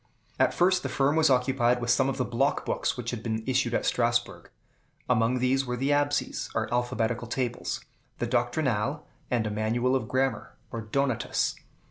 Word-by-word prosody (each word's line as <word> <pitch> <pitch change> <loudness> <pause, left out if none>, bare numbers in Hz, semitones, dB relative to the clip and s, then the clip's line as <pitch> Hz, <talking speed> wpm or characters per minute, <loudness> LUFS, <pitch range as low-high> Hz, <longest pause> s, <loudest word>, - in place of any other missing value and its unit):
At - - +4
first 185 +1 +3
the 135 - -3
firm 135 +3 +2
was 160 -1 +4
occupied 125 -1 +2
with 120 0 0
some 130 0 +3
of 135 - -3
the 125 - 0
block 135 +4 0
books - - -1
which 120 -1 -3
had 120 -3 -5
been 110 -1 -2
issued 130 -2 +1
at - - 0
Strasbourg. 120 -7 0 0.6
Among 120 +1 +2
these 130 +2 +2
were 125 -2 -3
the 135 +3 0
"Absies," 145 0 0
or 110 +1 -1
alphabetical 120 -1 -1
tables, 120 0 -3 0.3
the - - -1
"Doctrinale," 120 +2 0 0.3
and 120 -3 +1
a 105 - -2
manual 115 +5 +1
of 125 -5 -1
grammar, 130 +2 -1
or 115 - -4
"Donatus." 130 +3 0
125 Hz, 175 wpm, -27 LUFS, 115-135 Hz, 0.6 s, At